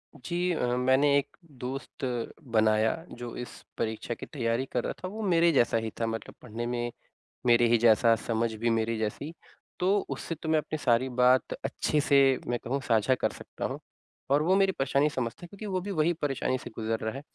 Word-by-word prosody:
जी, 175 Hz, +6 st, -2 dB
अ, 155 Hz, -, 0 dB
मैंने 130 Hz, +3 st, +4 dB
एक 140 Hz, -, -3 dB, 0.3 s
दोस्त 135 Hz, +1 st, -5 dB, 0.5 s
बनाया 110 Hz, 0 st, +3 dB, 0.3 s
जो 120 Hz, -1 st, -6 dB
इस 125 Hz, -, -5 dB, 0.3 s
परीक्षा 110 Hz, +1 st, -2 dB
की -, -, -8 dB
तैयारी 120 Hz, -2 st, -1 dB
कर 125 Hz, -, 0 dB
रहा -, -, -2 dB
था, -, -, -2 dB
वो 215 Hz, +4 st, -6 dB
मेरे 170 Hz, -4 st, +4 dB
जैसा 120 Hz, -6 st, +3 dB
ही 110 Hz, -, -4 dB
था 115 Hz, -, +1 dB
मतलब 115 Hz, 0 st, -5 dB
पढ़ने 120 Hz, -1 st, -5 dB
में 120 Hz, 0 st, -2 dB, 0.5 s
मेरे 120 Hz, 0 st, +5 dB
ही 120 Hz, 0 st, +4 dB
जैसा, 115 Hz, 0 st, +5 dB
समझ 115 Hz, 0 st, -1 dB
भी 115 Hz, +2 st, -1 dB
मेरे 115 Hz, 0 st, 0 dB
जैसी। 110 Hz, +8 st, -3 dB, 0.5 s
तो 180 Hz, -, +2 dB, 0.2 s
उससे 165 Hz, -, -4 dB
तो 160 Hz, +1 st, -6 dB
मैं 160 Hz, -, +4 dB
अपनी 155 Hz, +1 st, -4 dB
सारी 130 Hz, -1 st, +2 dB
बात 125 Hz, +1 st, +3 dB
अच्छे 150 Hz, -, 0 dB
से 135 Hz, -2 st, +4 dB
मैं 120 Hz, 0 st, -1 dB
कहूँ 135 Hz, +4 st, -1 dB
साझा 125 Hz, -1 st, +2 dB
कर -, -, -1 dB
सकता -, -, -7 dB
हूँ, -, -, -3 dB, 0.5 s
और 140 Hz, +2 st, +4 dB
वो 185 Hz, +4 st, +3 dB
मेरी 195 Hz, 0 st, +4 dB
परेशानी 140 Hz, -1 st, +1 dB
समझता 130 Hz, 0 st, -4 dB
है -, -, -7 dB
क्योंकि 200 Hz, +4 st, -9 dB
वो 190 Hz, -3 st, -1 dB
भी 200 Hz, +3 st, -5 dB
वही 165 Hz, -1 st, +2 dB
परेशानी 135 Hz, -2 st, 0 dB
से -, -, -9 dB
गुज़र 110 Hz, 0 st, -2 dB
रहा 110 Hz, 0 st, -3 dB
है। 135 Hz, -, -6 dB
125 Hz, 205 wpm, -28 LUFS, 115-150 Hz, 0.5 s, मेरे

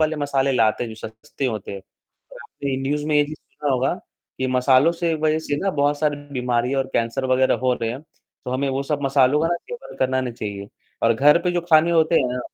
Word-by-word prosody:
वाले 155 Hz, 0 st, +1 dB
मसाले 140 Hz, -2 st, 0 dB
लाते 115 Hz, -1 st, +2 dB
हैं, 115 Hz, -, -6 dB
जो -, -, -8 dB
सस्ते 110 Hz, +5 st, -8 dB
होते 110 Hz, -5 st, -4 dB
हैं 100 Hz, -, -7 dB, 0.5 s
और -, -, -11 dB
आपने 140 Hz, -2 st, -5 dB
न्यूज़ 145 Hz, +2 st, -1 dB
में 155 Hz, -, 0 dB
ये 145 Hz, -, +4 dB
चीज़ 155 Hz, +1 st, -8 dB
सुना 145 Hz, -1 st, -5 dB
होगा, 130 Hz, +4 st, +1 dB, 0.4 s
कि 130 Hz, -, 0 dB
मसालों 130 Hz, +5 st, +3 dB
से 170 Hz, -1 st, -1 dB
वजह 155 Hz, 0 st, +1 dB
से 145 Hz, -2 st, -3 dB
ना 195 Hz, +5 st, -1 dB
बहुत 145 Hz, -2 st, +1 dB
सारी 150 Hz, -1 st, 0 dB, 0.2 s
बीमारियाँ 125 Hz, +1 st, 0 dB
और 135 Hz, -, -2 dB
कैंसर 115 Hz, +3 st, -1 dB
वगैरह 130 Hz, 0 st, +3 dB
हो 130 Hz, -1 st, +3 dB
रहे 115 Hz, -1 st, -3 dB
हैं, 125 Hz, +4 st, -6 dB
तो 155 Hz, -, -14 dB
हमें 135 Hz, +2 st, -1 dB
वो 135 Hz, +1 st, -1 dB
सब 145 Hz, 0 st, -3 dB
मसालों 135 Hz, +1 st, +3 dB
का 165 Hz, -, +1 dB
ना 175 Hz, -, +1 dB
सेवन 485 Hz, -, -10 dB
करना 130 Hz, 0 st, +1 dB
नहीं 125 Hz, -2 st, -4 dB
चाहिए 100 Hz, -3 st, -6 dB, 0.3 s
और 115 Hz, 0 st, +4 dB
घर 150 Hz, +7 st, +5 dB
पे 180 Hz, -, +1 dB
जो 175 Hz, -, 0 dB
खाने 160 Hz, +1 st, +5 dB
होते 165 Hz, 0 st, +3 dB
हैं 130 Hz, -, 0 dB
ना 125 Hz, -, -3 dB
135 Hz, 240 wpm, -22 LUFS, 125-155 Hz, 0.5 s, घर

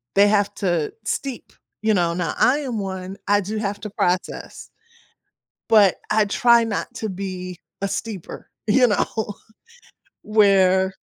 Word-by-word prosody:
they 200 Hz, +1 st, +6 dB
have 205 Hz, -1 st, +2 dB
to 175 Hz, -6 st, -1 dB
steep, 265 Hz, +5 st, -4 dB, 0.3 s
you 220 Hz, 0 st, +3 dB
know, 175 Hz, -3 st, +1 dB
now 170 Hz, -3 st, -2 dB
I 280 Hz, +4 st, +4 dB
am 250 Hz, -7 st, -3 dB
one, 190 Hz, 0 st, -5 dB
I 205 Hz, 0 st, +3 dB
do 210 Hz, +3 st, -4 dB
have 205 Hz, -1 st, -3 dB
to 210 Hz, -, -5 dB
process, 180 Hz, +1 st, -2 dB, 1.0 s
but 205 Hz, -4 st, +6 dB, 0.2 s
I 215 Hz, -1 st, +4 dB
try 235 Hz, +3 st, +4 dB
not 225 Hz, +1 st, -3 dB
to 220 Hz, -3 st, -4 dB
be 185 Hz, -2 st, -6 dB, 0.2 s
a 200 Hz, -, 0 dB
steeper, 195 Hz, -2 st, -6 dB, 0.2 s
you 250 Hz, +3 st, +5 dB
know, 210 Hz, 0 st, -1 dB, 0.9 s
where 190 Hz, -3 st, +4 dB
200 Hz, 140 wpm, -22 LUFS, 185-220 Hz, 1.0 s, they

